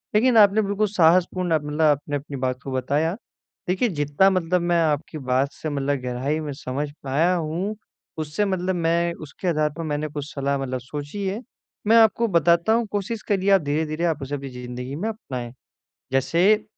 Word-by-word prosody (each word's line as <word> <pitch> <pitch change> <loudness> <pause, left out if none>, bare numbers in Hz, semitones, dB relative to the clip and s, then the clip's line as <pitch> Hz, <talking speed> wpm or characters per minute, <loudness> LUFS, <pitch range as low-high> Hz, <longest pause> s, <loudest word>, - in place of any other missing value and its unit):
लेकिन 235 +2 +4
आपने 210 0 +6
बिल्कुल 205 +1 0
साहसपूर्ण 180 -1 +3
मतलब 150 +1 -4
आपने 145 -1 +2
अपनी 140 0 -5
बात 130 -1 -2
को 135 - -5
बताया। 145 +6 0 0.5
देखिए 190 +7 +1
जितना 145 +3 +2
मतलब 180 -1 +1
मैं 175 0 +2
आपकी 155 +1 -1
बात 130 0 0
से 155 - -5
मतलब 140 -1 -1
गहराई 130 +5 -2
में 150 -2 -4
समझ 140 +1 -4
पाया 150 +7 +2
हूँ 170 +6 -2 0.4
उससे 155 +6 -1
मतलब 185 -1 -1
मैं 170 0 +1
उसके 155 +5 -7
आधार 155 -3 +2
पर 165 - -3
मैंने 150 -1 -2
कुछ 145 -1 -5
सलाह 140 0 0
मतलब 130 -1 -3
सोची 145 - -6
है। 195 +3 -2 0.5
मैं 225 - +6
आपको 225 +1 +5
बताता 170 +2 +3
हूँ 230 0 +2
कोशिश 210 +2 -2
करिए 195 -1 +1
आप 195 -3 +6
धीरे-धीरे 155 +2 -1
आप 160 -3 0
उसे 140 +1 -3
अपनी 135 -1 -6
ज़िंदगी 125 +1 -6
में 185 +9 -3
अपनाएँ। 130 - -6 0.6
जैसे, 180 +10 +3
155 Hz, 180 wpm, -23 LUFS, 140-185 Hz, 0.6 s, आपने